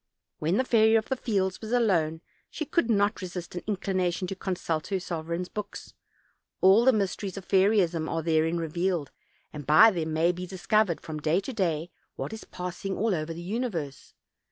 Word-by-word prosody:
When 165 Hz, +6 st, +1 dB
the 260 Hz, -, +3 dB
Fairy 225 Hz, -3 st, +4 dB
of 220 Hz, -1 st, +1 dB
the 265 Hz, -, +1 dB
Fields 195 Hz, -6 st, -1 dB
was 220 Hz, 0 st, -6 dB
alone 170 Hz, -10 st, +2 dB, 0.3 s
she 310 Hz, -, -4 dB
could 280 Hz, -4 st, 0 dB
not 205 Hz, -1 st, +2 dB
resist 180 Hz, -1 st, -6 dB
an 175 Hz, -, -4 dB
inclination 185 Hz, -3 st, -1 dB
to 195 Hz, -, -4 dB
consult 175 Hz, -4 st, -3 dB
her 195 Hz, -2 st, -1 dB
sovereign's 170 Hz, 0 st, -4 dB
books. 210 Hz, +2 st, -7 dB, 0.7 s
All 195 Hz, +5 st, +6 dB
the 260 Hz, -, +7 dB
mysteries 200 Hz, -2 st, -2 dB
of 195 Hz, -, -8 dB
fairyism 190 Hz, -5 st, +3 dB
are 165 Hz, -1 st, -2 dB
therein 160 Hz, +1 st, +2 dB
revealed, 170 Hz, -1 st, -1 dB, 0.4 s
and 145 Hz, -3 st, -8 dB
by 155 Hz, +10 st, +8 dB
them 160 Hz, -4 st, -3 dB
may 160 Hz, +2 st, +3 dB
be 180 Hz, +1 st, -6 dB
discovered, 190 Hz, 0 st, +1 dB
from 155 Hz, -2 st, -6 dB
day 155 Hz, +4 st, +2 dB
to 265 Hz, -, -6 dB
day, 170 Hz, -5 st, -1 dB, 0.2 s
what -, -, -5 dB
is 220 Hz, -, -8 dB
pass 180 Hz, 0 st, -7 dB
ing 195 Hz, -1 st, -2 dB
all 220 Hz, 0 st, +1 dB
over 155 Hz, -1 st, -2 dB
the 170 Hz, +1 st, -7 dB
universe. 180 Hz, -, -4 dB
185 Hz, 185 wpm, -27 LUFS, 165-210 Hz, 0.7 s, by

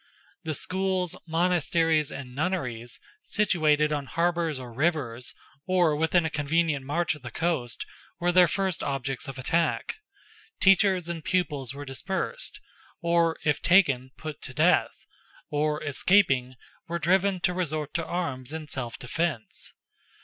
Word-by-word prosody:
The 160 Hz, -2 st, -2 dB
schools, 185 Hz, +1 st, -1 dB
monasteries, 165 Hz, -2 st, +2 dB
and 130 Hz, -3 st, -7 dB
nunneries, 125 Hz, -7 st, -2 dB, 0.2 s
situated 155 Hz, -, +2 dB
on 145 Hz, -2 st, -3 dB
harbours 170 Hz, 0 st, 0 dB
or 125 Hz, -2 st, -8 dB
rivers, 130 Hz, -4 st, -1 dB, 0.3 s
or 175 Hz, -4 st, +3 dB
within 160 Hz, +2 st, +2 dB
a 160 Hz, -, -1 dB
convenient 150 Hz, -1 st, +1 dB
march 170 Hz, +4 st, +1 dB
of 150 Hz, -, -11 dB
the 125 Hz, -, -7 dB
coast, 135 Hz, -4 st, -2 dB, 0.3 s
were 175 Hz, 0 st, +2 dB
their 180 Hz, 0 st, +6 dB
first 190 Hz, 0 st, -1 dB
objects 135 Hz, -2 st, -3 dB
of 135 Hz, -1 st, -6 dB
attack; 165 Hz, -, 0 dB, 0.6 s
teachers 190 Hz, -2 st, +4 dB
and 170 Hz, -2 st, -4 dB
pupils 145 Hz, -9 st, -1 dB
were 145 Hz, 0 st, -7 dB
dispersed, 190 Hz, -, -3 dB, 0.4 s
or, 170 Hz, -1 st, +2 dB
if 150 Hz, -2 st, +2 dB
taken, 140 Hz, -9 st, +4 dB
put 155 Hz, -2 st, -7 dB
to 130 Hz, -, -7 dB
death, 165 Hz, +3 st, +2 dB, 0.5 s
or, 150 Hz, +1 st, 0 dB
escaping, 140 Hz, -4 st, +3 dB, 0.3 s
were 170 Hz, +1 st, -2 dB
driven 185 Hz, +3 st, +2 dB
to 180 Hz, -, +2 dB
resort 155 Hz, -4 st, -2 dB
to 165 Hz, -, -1 dB
arms 145 Hz, -7 st, -3 dB
in 160 Hz, -1 st, -5 dB
self 120 Hz, -5 st, -4 dB
defence. 140 Hz, -2 st, -3 dB
160 Hz, 135 wpm, -27 LUFS, 140-175 Hz, 0.6 s, their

